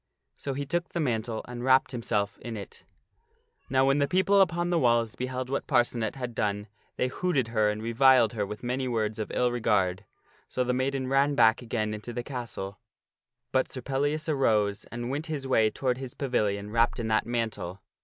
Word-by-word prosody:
So 140 -1 -4
he 140 +1 -3
took 175 +4 -2
the 170 - -3
mantle 115 -6 -1
and 120 0 -6
wrapped 130 0 +4
himself 105 -5 -2
in 115 -2 -6
it. 100 - -10 0.8
Now 130 0 +3
when 135 +1 +3
the 140 - +2
people 190 +4 +4
upon 175 -1 +1
the 170 - +3
walls 120 -4 +2
beheld 130 0 -3
what 140 - -2
Parcenet 120 -2 +1
had 125 -3 -5
done, 105 -1 -1 0.3
they 125 - 0
hooted 135 -4 0
her 110 -2 +2
and 105 +1 -3
reviled 120 0 +5
her 105 -3 -1
with 105 +3 -6
many 130 +2 -1
words 110 -3 -1
of 110 - -3
ill 125 -1 +1
regard. 105 -5 +1 0.5
So 125 - 0
the 125 0 0
maiden 130 +1 -1
ran 135 +2 +2
back 115 -1 +5
again 110 -3 -2
into 105 +3 -6
the 120 - -3
castle, 115 -7 -6 0.7
but 130 0 +1
Sir 130 - -6
Pellias 145 +4 -1
arose 110 -9 +1
and 120 +2 -5
went 150 +4 -3
his 150 -4 -4
way 110 -4 +3
toward 125 +2 -1
his 130 -2 -7
pavilion 105 -6 -1
wrapped 115 +2 +2
in 115 - -2
that 110 0 +2
mantle. 110 -6 -3
120 Hz, 195 wpm, -28 LUFS, 110-135 Hz, 0.8 s, reviled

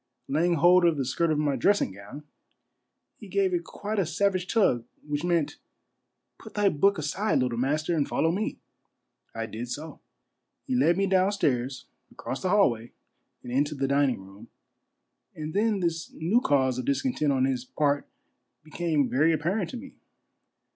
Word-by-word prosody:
Laying 170 +5 +2
hold 175 +3 +5
of 170 -3 +3
the 135 - -1
skirt 160 +6 0
of 155 - +1
my 145 -2 +1
dressing 200 - +2
gown, 105 +10 -11 0.9
he - - -11
gave 390 -2 +1
it 350 -1 0
quite 210 +1 -4
a 190 - +2
savage 185 +1 0
tug, 160 - +2 0.2
which 145 +1 -2
meant, 170 -4 0 0.8
"Put 220 - -13
thy 205 -1 +3
book 195 +5 +2
aside, 165 +8 0
little 125 -3 0
master, 155 +6 0
and 145 -3 +1
follow 165 - +1
me." 205 +5 -2 0.8
I 115 0 -3
did 115 +2 -6
so. 150 +6 -6 0.7
He 260 - -3
led 175 -8 +3
me 195 - +2
down 190 0 +3
stall's 130 -9 -1 0.3
across 135 - -6
the 185 - -1
hallway 120 - +2 0.5
and 125 - -7
into 145 +4 0
the 135 -1 -1
dining 140 -3 +2
room, 100 +4 -14 0.9
and 155 0 -6
then 210 -1 +1
this 165 -1 -2
new 190 +10 +1
cause 130 - +2
of 125 - -4
discontent 150 - 0
on 130 -1 +2
his 130 -2 -1
part 145 +2 0 0.6
became 155 -3 0
very 155 +7 +3
apparent 170 +5 -1
to 255 - -6
me. 270 +3 -10
155 Hz, 170 wpm, -27 LUFS, 135-190 Hz, 0.9 s, hold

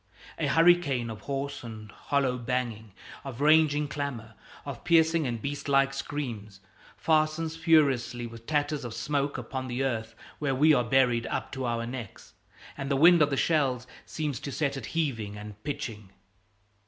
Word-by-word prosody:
A 155 - +1
hurricane 155 -7 +3
of 110 - -9
hoarse 140 0 -4
and 110 -3 -9
hollow 135 0 0
banging, 120 -4 -3 0.3
of 135 -3 -7
raging 150 0 +4
clamor, 135 -6 -5 0.3
of - - -7
piercing 165 -2 +3
and 120 -2 -3
beast 140 +4 -4
like 135 0 +3
screams, 115 -9 -5 0.4
fastens 155 +1 +1
furiously 140 -7 +2
with 115 0 -11
tatters 150 -1 0
of 120 -2 -6
smoke 140 +4 -1
upon 130 +1 -5
the 125 +2 -2
earth 115 -4 -2 0.2
where 140 -3 0
we 155 +4 +5
are 125 - +3
buried 120 -1 +2
up - - -3
to 130 -1 -4
our 115 -1 -1
necks, 120 -4 -8 0.4
and 140 -1 -5
the 140 - +2
wind 170 +3 +7
of 145 - +5
the 135 - -1
shells 135 -7 +1 0.2
seems 150 -5 -3
to 140 - -6
set 140 -1 -1
it 135 - -6
heaving 115 -10 -1
and 105 0 -10
pitching. 115 -8 -5
135 Hz, 165 wpm, -28 LUFS, 115-150 Hz, 0.4 s, wind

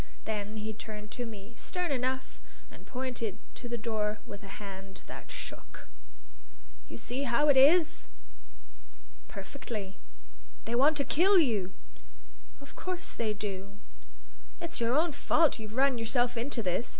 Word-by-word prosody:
Then 210 0 -2
he 215 +1 -3
turned 210 -1 -8
to 245 -1 -3
me, 210 0 -9
stern 360 -3 -2
enough, 260 0 -1 0.3
and - - -14
pointed 245 -5 -3 0.2
to 240 - -8
the 235 - -1
door 215 -2 0
with 200 +1 -8
a 195 -1 -8
hand 195 -1 -8
that - - -9
shook. - - -7 1.0
"You - - -6
see 250 +3 -3
how 295 +6 +4
it 285 - +7
is?" 325 +5 +6 1.2
"Perfectly." 215 -8 -6 0.7
"They 230 - -2
want 285 +5 +5
to 280 - +2
kill 380 +5 +5
you!" 215 - +3 0.9
"Of 280 - -13
course 370 0 -4
they 215 -2 0
do." 200 -1 -5 0.8
"It's 335 -5 -4
your 235 +4 +3
own 330 +2 +3
fault; 305 0 +3
you've 215 0 -7
run 270 -2 +4
yourself 240 +2 +2
into 235 0 -1
this. 185 +5 0
235 Hz, 145 wpm, -31 LUFS, 210-280 Hz, 1.2 s, it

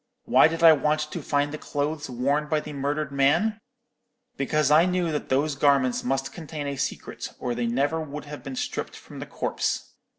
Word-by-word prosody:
Why - - +6
did 165 +1 -3
I 165 -1 +10
want 150 +1 +1
to 150 - -5
find 145 0 0
the 155 - -6
clothes 145 0 -3
worn 140 +5 0
by 155 - +2
the 150 0 -8
murdered 145 +1 -2
man? 160 +11 +2 0.8
Because 150 +1 +1
I 160 +4 +6
knew 180 -2 0
that 150 - -3
those 140 +3 +2
garments 140 -3 +2
must 135 +1 -1
contain 155 -3 -6
a 140 0 -3
secret, - - -4
or 125 - -2
they 120 0 -1
never 140 +7 0
would 150 -1 -7
have 145 -2 -8
been 135 0 -7
stripped - - -4
from - - -11
the - - -6
corpse. - - -2
145 Hz, 195 wpm, -25 LUFS, 140-155 Hz, 0.8 s, I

